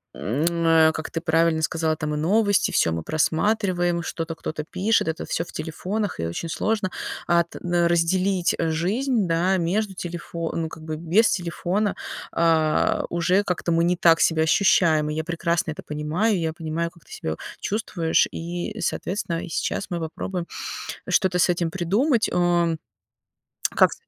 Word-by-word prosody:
м, 135 - -1 0.2
э, 160 -1 +6
как 160 - -5
ты 165 - -4
правильно 165 -1 +2
сказала, 160 0 0
там 150 -1 -3
и - - -1
новости, 205 +5 +2
всё 80 - +2
мы 80 0 -2
просматриваем, 175 - +1
что-то 165 0 -4
кто-то 155 -1 -5
пишет, 190 +5 +1
это 160 - -2
всё 165 - -1
в 175 - -12
телефонах, 185 +6 -3
и 85 - -1
очень 160 - -4
сложно, 205 +1 -1 0.4
а, 170 0 +4
т 170 - -12
на 175 -1 +2
разделить 180 +2 +2
жизнь, 195 - 0
да, 175 +3 +2
между 190 +3 -1
телефон 170 -1 -4
ну, 160 - -3
как 160 - -11
бы 155 -1 -4
без 175 +8 +3
телефона, 185 +3 -1 0.4
а, 160 -2 +2
уже 180 +4 +2
как-то 180 -2 -2
мы 165 0 +3
не 175 +1 +2
так 165 -1 +5
себя 160 -1 +3
ощущаем, 160 -3 +3
и 150 - -3
я 160 - -1
прекрасно 170 -1 -1
это - - -7
понимаю, 160 +8 0
я 160 -1 -1
понимаю, 165 +1 -3
как 170 - -22
ты - - -20
себя 80 0 -4 0.2
чувствуешь, 180 -6 +1
и, 175 +1 -5
соответственно, 180 -3 -2
и - - -7
сейчас 200 - -2
мы 175 -2 -2
попробуем 170 +2 -4 0.6
что-то 185 -3 +2
с 180 - +4
этим 170 -1 +1
придумать. 210 - +1
Э, 175 -2 +2 1.0
как - - +5
ты - - -6
170 Hz, 165 wpm, -24 LUFS, 160-185 Hz, 1.0 s, э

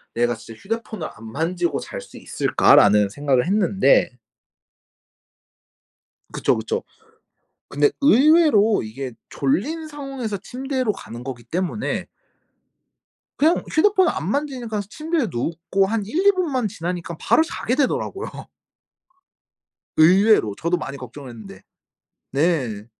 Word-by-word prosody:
'내가 120 0 +1
진짜 115 0 -12
휴대폰을 220 -4 -4
안 110 0 -11
만지고 165 +1 -1
잘 - - -7
수 - - -14
있을까?'라는 105 0 +4
생각을 135 +2 +1
했는데 205 - +3 2.2
그쵸, - - +1
그쵸. 455 +1 -3 0.9
근데 430 - +2
의외로 280 -6 +5
이게 125 +4 -6 0.2
졸린 295 - -1
상황에서 275 -8 -5
침대로 255 +2 -2
가는 120 - -10
거기 130 -3 -6
때문에 180 - -3 1.3
그냥 320 +4 +3
휴대폰을 375 +1 +3
안 175 - -3
만지니까 250 -7 -2
침대에 315 -1 -1
눕고 170 +9 -1
한 215 +1 -1
1-2 360 - +3
분만 300 - -1
지나니깐 175 -2 -5
바로 315 - +3
자게 250 -7 -3
되더라고요. 300 - -2 1.5
의외로 180 - +5
저도 170 +2 0
많이 140 -4 -6
걱정을 130 +1 -10
했는데. 105 -5 -11 0.7
네. 135 -8 0
195 Hz, 255 characters per minute, -22 LUFS, -, 2.2 s, 의외로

